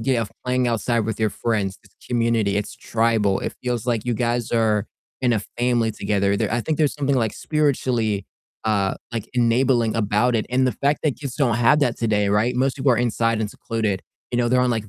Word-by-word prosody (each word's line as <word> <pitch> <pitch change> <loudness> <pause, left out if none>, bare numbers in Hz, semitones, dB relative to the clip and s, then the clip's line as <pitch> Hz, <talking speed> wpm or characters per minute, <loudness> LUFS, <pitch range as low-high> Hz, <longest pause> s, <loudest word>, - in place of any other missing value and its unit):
get 130 +2 +1
of 105 - -4
playing 125 0 +1
outside 115 +1 0
with 110 0 -3
your 110 -2 +2
friends, 105 -5 -2
it's - - -22
community, 115 -4 +1
it's 105 0 -3
tribal, 110 -4 +1
it - - -4
feels 125 -2 -2
like 115 -2 0
you 120 -1 0
guys 120 0 -1
are 110 -2 +2 0.3
in 125 -2 +2
a 110 - +1 0.2
family 120 -2 +1
together. 100 -1 0
There - - -1
I 120 - +1
think 155 +5 -2
there's 150 -3 +2
something 140 -1 0
like 115 -4 +1
spiritually, 125 -9 0 0.4
uh, 100 -3 +1 0.2
like, 115 -2 -4
enabling 120 -1 +2
about 115 +3 +1
it, 110 - 0
and 130 +1 +2
the 125 - +1
fact 140 +7 0
that 150 -4 0
kids 140 -4 -5
don't 125 -7 +2
have 120 +5 +4
that 125 -5 +1
today, 105 -3 +1
right? 105 +5 +2
Most 130 +1 +1
people 135 -1 +2
are - - +2
inside 115 -1 +1
and 105 - -1
secluded. 110 -4 -2 0.3
You 120 - +1
know, 120 -1 +2
they're 125 +1 +3
on 125 0 +2
like 110 -3 -2
115 Hz, 220 wpm, -22 LUFS, 110-125 Hz, 0.4 s, have